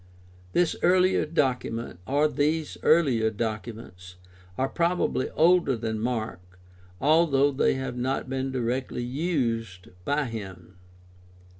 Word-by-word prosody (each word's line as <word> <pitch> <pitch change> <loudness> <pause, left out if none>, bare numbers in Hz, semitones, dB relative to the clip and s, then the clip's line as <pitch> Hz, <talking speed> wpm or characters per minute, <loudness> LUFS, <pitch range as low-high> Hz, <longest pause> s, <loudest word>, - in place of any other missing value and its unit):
This 175 -1 +2
earlier 185 -1 +3
document, 125 - -1
or 145 +4 +3
these 150 +2 -1
earlier 130 -9 +3
documents 110 -4 -6
(Luke 90 0 -25
1:1 - - -24
4), 130 - +1
are - - -4
probably 170 -5 0
older 165 -5 +4
than 110 -1 -3
Mark, 110 -5 -3 0.6
although 145 -2 +3
they 135 - +2
have 130 -2 -4
not 130 +2 -2
been 135 0 -2
directly 125 0 -2
used 120 - -2
by 145 +7 0
him. 95 -7 -8
130 Hz, 125 wpm, -26 LUFS, 110-150 Hz, 0.6 s, older